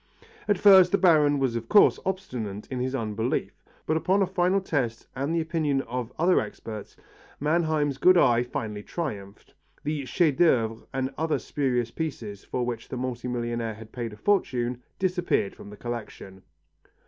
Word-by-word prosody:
At 205 Hz, -2 st, +3 dB
first 190 Hz, -2 st, +7 dB
the 200 Hz, -, +4 dB
Baron 155 Hz, -6 st, +4 dB
was 130 Hz, -4 st, 0 dB
of 115 Hz, 0 st, -4 dB
course 205 Hz, -, +6 dB
obstinate 125 Hz, -, -4 dB
in 130 Hz, -, -2 dB
his 130 Hz, +2 st, -1 dB
unbelief, 110 Hz, 0 st, -2 dB, 0.2 s
but 155 Hz, -, +1 dB
upon 185 Hz, +5 st, +2 dB
a -, -, +2 dB
final 185 Hz, +1 st, +1 dB
test 130 Hz, -11 st, -2 dB
and 140 Hz, +3 st, -2 dB
the 165 Hz, -, +2 dB
opinion 155 Hz, -4 st, 0 dB
of 125 Hz, 0 st, -4 dB
other 180 Hz, +3 st, +4 dB
experts, 105 Hz, 0 st, -7 dB, 0.4 s
Mannheim's 150 Hz, -2 st, +1 dB
good 185 Hz, +5 st, +6 dB
eye 120 Hz, -7 st, +5 dB
finally 110 Hz, -4 st, -4 dB
triumphed. 105 Hz, -, -6 dB, 0.3 s
The 150 Hz, -2 st, -2 dB
chef 155 Hz, -5 st, +2 dB
d'œuvre 115 Hz, -9 st, +2 dB
and 130 Hz, 0 st, -2 dB
other 160 Hz, -1 st, +1 dB
spurious 125 Hz, -5 st, -1 dB
pieces 115 Hz, -11 st, -5 dB
for 125 Hz, -1 st, -2 dB
which 120 Hz, -2 st, -5 dB
the 130 Hz, -, -4 dB
multi 125 Hz, -1 st, -4 dB
millionaire 120 Hz, -2 st, -2 dB
had 110 Hz, 0 st, -12 dB
paid 120 Hz, -3 st, -4 dB
a 105 Hz, -, -11 dB
fortune 125 Hz, -, 0 dB, 0.2 s
disappeared 180 Hz, -, 0 dB
from -, -, -11 dB
the 105 Hz, -, -11 dB
collection. 105 Hz, -5 st, -7 dB
130 Hz, 165 wpm, -26 LUFS, 115-165 Hz, 0.4 s, first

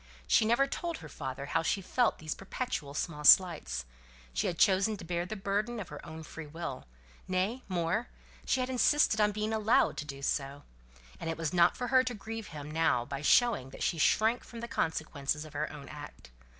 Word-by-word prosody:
She 220 Hz, -, +4 dB
never 235 Hz, +5 st, +4 dB
told 335 Hz, +4 st, -4 dB
her -, -, -10 dB
father 135 Hz, -1 st, -6 dB
how -, -, 0 dB
she 165 Hz, -, 0 dB
felt 235 Hz, +5 st, +1 dB
these 155 Hz, -1 st, -4 dB
perpetual 190 Hz, -, -4 dB
small 150 Hz, -2 st, -3 dB
slights: 170 Hz, -, +5 dB, 0.5 s
she -, -, 0 dB
had 170 Hz, -, -2 dB
chosen 200 Hz, +3 st, +3 dB
to 175 Hz, -, -9 dB
bear 175 Hz, +1 st, -2 dB
the 215 Hz, -, -4 dB
burden 210 Hz, +4 st, -1 dB
of 190 Hz, -, -6 dB
her -, -, -9 dB
own 160 Hz, -1 st, -8 dB
free 160 Hz, 0 st, -8 dB
will; 150 Hz, -, -6 dB, 0.4 s
nay, 190 Hz, +7 st, 0 dB
more, 180 Hz, +5 st, -1 dB, 0.4 s
she 260 Hz, -, +1 dB
had 255 Hz, -, -2 dB
insisted 255 Hz, -3 st, +3 dB
on 210 Hz, 0 st, +4 dB
being 215 Hz, +1 st, -2 dB
allowed 220 Hz, +2 st, +3 dB
to 150 Hz, -, -4 dB
do 140 Hz, -2 st, -8 dB
so; 140 Hz, 0 st, -2 dB, 0.6 s
and 165 Hz, -, -4 dB
it 165 Hz, -, -2 dB
was 165 Hz, -1 st, -2 dB
not 175 Hz, -1 st, +4 dB
for 245 Hz, -, -3 dB
her 260 Hz, -1 st, +5 dB
to 250 Hz, -2 st, -3 dB
grieve 220 Hz, +1 st, -6 dB
him 150 Hz, -1 st, -8 dB
now 155 Hz, -7 st, +2 dB
by 140 Hz, +1 st, -5 dB
showing 205 Hz, -, +3 dB
that -, -, -7 dB
she 165 Hz, -, 0 dB
shrank 220 Hz, +9 st, +3 dB
from 235 Hz, -, -10 dB
the 235 Hz, -, -4 dB
consequences 155 Hz, -6 st, -2 dB
of 155 Hz, -, -12 dB
her 150 Hz, +1 st, -2 dB
own 140 Hz, -2 st, -10 dB
act. 145 Hz, -, -10 dB
175 Hz, 205 wpm, -31 LUFS, 150-220 Hz, 0.6 s, slights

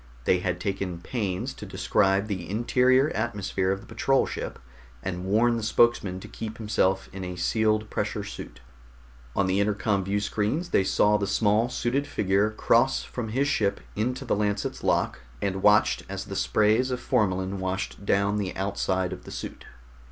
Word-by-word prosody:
They 90 Hz, -, +3 dB
had 90 Hz, -1 st, -2 dB
taken 95 Hz, -2 st, -3 dB
pains 95 Hz, -1 st, -3 dB
to -, -, -11 dB
describe 95 Hz, 0 st, +1 dB
the 95 Hz, -5 st, -4 dB
interior 125 Hz, +6 st, +3 dB
atmosphere 100 Hz, -4 st, -1 dB
of 95 Hz, 0 st, -2 dB
the -, -, -14 dB
patrol 135 Hz, 0 st, +2 dB
ship -, -, -5 dB, 0.5 s
and 90 Hz, -1 st, -4 dB
warn 115 Hz, +4 st, +3 dB
the -, -, -3 dB
spokesman 110 Hz, -4 st, +2 dB
to -, -, -9 dB
keep 110 Hz, -1 st, -7 dB
himself 105 Hz, -3 st, +1 dB
in 95 Hz, 0 st, -6 dB
a 90 Hz, 0 st, -5 dB
sealed 110 Hz, +3 st, +1 dB
pressure -, -, -2 dB
suit. -, -, -9 dB, 0.7 s
On 100 Hz, -, +2 dB
the 95 Hz, +1 st, +1 dB
intercom 100 Hz, -1 st, +1 dB
viewscreens 105 Hz, -, -1 dB
they -, -, +4 dB
saw 105 Hz, +2 st, +3 dB
the 100 Hz, -, -1 dB
small 105 Hz, +3 st, +2 dB
suited 130 Hz, +3 st, -1 dB
figure 100 Hz, -4 st, +1 dB
cross 115 Hz, +4 st, +2 dB
from 120 Hz, -3 st, -5 dB
his 135 Hz, +6 st, +1 dB
ship 100 Hz, -8 st, +1 dB, 0.2 s
into 125 Hz, +5 st, -2 dB
the 120 Hz, -, +1 dB
Lancet's 105 Hz, 0 st, -1 dB
lock, -, -, +1 dB, 0.2 s
and 95 Hz, -1 st, -2 dB
watched 105 Hz, +1 st, +4 dB
as -, -, -4 dB
the -, -, -6 dB
sprays 110 Hz, +5 st, +2 dB
of 125 Hz, -1 st, -2 dB
formalin 95 Hz, -4 st, 0 dB
washed 95 Hz, +2 st, -3 dB
down 100 Hz, +1 st, +2 dB
the 95 Hz, -2 st, -3 dB
outside 95 Hz, -1 st, -1 dB
of -, -, -9 dB
the -, -, -9 dB
suit. -, -, -7 dB
105 Hz, 170 wpm, -26 LUFS, 95-115 Hz, 0.7 s, they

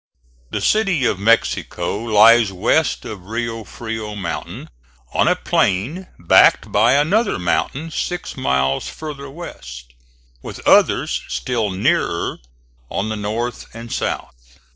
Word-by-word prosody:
The -, -, -3 dB
City 195 Hz, -11 st, +2 dB
of 95 Hz, -, 0 dB
Mexico 100 Hz, -5 st, +1 dB
lies 115 Hz, -1 st, +5 dB
west 90 Hz, -, +1 dB
of 100 Hz, -4 st, -8 dB
Rio 115 Hz, 0 st, -3 dB
Frio 110 Hz, -2 st, -6 dB
mountain, 95 Hz, -9 st, -6 dB, 0.4 s
on -, -, +2 dB
a -, -, +4 dB
plain 130 Hz, -, 0 dB
backed 85 Hz, -, +4 dB
by 120 Hz, +2 st, +4 dB
another 190 Hz, +11 st, +2 dB
mountain 135 Hz, -, -1 dB
six 180 Hz, +2 st, -4 dB
miles 65 Hz, -, 0 dB
farther 145 Hz, -3 st, -8 dB
west, 65 Hz, -, -10 dB, 0.5 s
with -, -, -8 dB
others -, -, +3 dB
still 115 Hz, -4 st, -2 dB
nearer 100 Hz, -, 0 dB, 0.5 s
on 100 Hz, +3 st, -2 dB
the 110 Hz, -, -2 dB
north 110 Hz, +3 st, -4 dB
and 115 Hz, 0 st, -7 dB
south. -, -, -5 dB
115 Hz, 120 wpm, -19 LUFS, 95-140 Hz, 0.5 s, lies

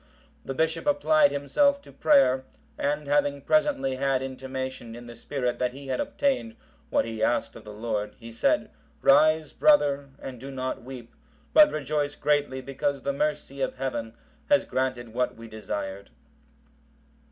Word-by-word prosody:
The 135 Hz, -, -5 dB
bishop 160 Hz, -, 0 dB
applied 290 Hz, +1 st, +4 dB
himself 280 Hz, -, +2 dB
to -, -, -14 dB
prayer, 135 Hz, -, +4 dB, 0.3 s
and 145 Hz, +1 st, -1 dB
having 145 Hz, 0 st, +1 dB
presently 285 Hz, -, +2 dB
had 135 Hz, -1 st, +1 dB
intimation 130 Hz, -2 st, -5 dB
in 120 Hz, 0 st, -10 dB
the 120 Hz, 0 st, -10 dB
spirit 125 Hz, -3 st, -3 dB
that 125 Hz, -1 st, 0 dB
he 135 Hz, 0 st, -10 dB
had -, -, -1 dB
obtained 280 Hz, -5 st, -1 dB, 0.3 s
what -, -, +2 dB
he 115 Hz, -1 st, -5 dB
asked 120 Hz, -, +1 dB
of -, -, -12 dB
the 105 Hz, -, -8 dB
Lord, 105 Hz, -1 st, -3 dB
he 115 Hz, -1 st, -10 dB
said, 115 Hz, -, +1 dB, 0.3 s
"Rise, 155 Hz, +1 st, +5 dB
brother, 145 Hz, -, +3 dB
and 130 Hz, -3 st, -8 dB
do 135 Hz, +3 st, -8 dB
not 130 Hz, -1 st, -4 dB
weep, 125 Hz, -1 st, -10 dB, 0.4 s
but 305 Hz, -1 st, +8 dB
rejoice 145 Hz, 0 st, -1 dB
greatly 145 Hz, -3 st, 0 dB
because 135 Hz, +1 st, -2 dB
the 140 Hz, -, 0 dB
mercy 145 Hz, -1 st, -2 dB
of -, -, -1 dB
Heaven 120 Hz, -4 st, -3 dB, 0.3 s
has 290 Hz, -1 st, +4 dB
granted 130 Hz, -2 st, -2 dB
what 125 Hz, +1 st, 0 dB
we 115 Hz, 0 st, -11 dB
desired." 100 Hz, -3 st, -5 dB
135 Hz, 155 wpm, -26 LUFS, 125-150 Hz, 0.4 s, but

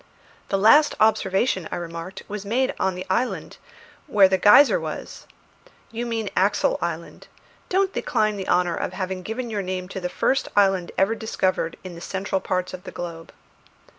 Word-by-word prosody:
"The 195 Hz, -, +1 dB
last 295 Hz, +10 st, +5 dB
observation," 195 Hz, -3 st, +2 dB
I -, -, -2 dB
remarked, 170 Hz, +1 st, -7 dB
"was 205 Hz, -1 st, -5 dB
made 245 Hz, +6 st, 0 dB
on 190 Hz, -1 st, 0 dB
the 180 Hz, -, -6 dB
island, 240 Hz, +7 st, -2 dB, 0.5 s
when 205 Hz, -8 st, +6 dB
the 190 Hz, -, +4 dB
geyser 280 Hz, -, +7 dB
was -, -, -7 dB, 0.3 s
" -, -, -28 dB
"You 235 Hz, +1 st, -4 dB
mean 225 Hz, -3 st, -3 dB
Axel 205 Hz, -, +2 dB
Island. -, -, -5 dB, 0.4 s
Don't 385 Hz, +1 st, +1 dB
decline 215 Hz, -3 st, 0 dB
the 195 Hz, -2 st, -5 dB
honour 180 Hz, -1 st, +2 dB
of -, -, -3 dB
having 185 Hz, 0 st, -4 dB
given 225 Hz, +5 st, -5 dB
your 210 Hz, -2 st, -1 dB
name 185 Hz, -1 st, -4 dB
to 190 Hz, -, -5 dB
the 180 Hz, -1 st, -3 dB
first 270 Hz, +8 st, 0 dB
island 195 Hz, -3 st, +3 dB
ever 195 Hz, +4 st, +3 dB
discovered 190 Hz, -7 st, -1 dB
in 185 Hz, -2 st, -8 dB
the 170 Hz, -, -10 dB
central 190 Hz, +1 st, -2 dB
parts 185 Hz, 0 st, -2 dB
of 185 Hz, -1 st, -8 dB
the -, -, -8 dB
globe." 165 Hz, -2 st, -7 dB
195 Hz, 175 wpm, -23 LUFS, 185-225 Hz, 0.5 s, geyser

